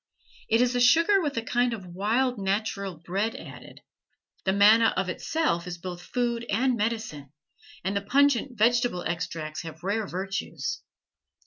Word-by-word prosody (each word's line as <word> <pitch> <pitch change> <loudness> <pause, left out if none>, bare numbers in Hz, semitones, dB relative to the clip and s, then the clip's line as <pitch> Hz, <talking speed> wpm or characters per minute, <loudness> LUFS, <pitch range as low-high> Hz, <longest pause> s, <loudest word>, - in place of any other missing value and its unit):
It 225 +2 +4
is 250 0 +2
a - - +2
sugar 335 +10 +5
with 290 -6 -2
a 230 - -1
kind 245 +1 +1
of 195 -4 -10
wild 220 +7 0
natural 200 -1 -2
bread 195 +7 -2
added. - - -11 0.6
The 190 - +3
manna 215 +3 +5
of 185 0 0
itself 185 - -1
is 175 -1 -5
both 175 0 -7
food 235 +3 -2
and 250 +4 +2
medicine, 215 - -3 0.5
and 195 +2 -1
the 200 - 0
pungent 265 +2 +2
vegetable 230 -4 +2
extracts 160 -2 -4
have 160 0 -10
rare 205 +2 -1
virtues. 195 - -4
215 Hz, 150 wpm, -27 LUFS, 185-245 Hz, 0.6 s, sugar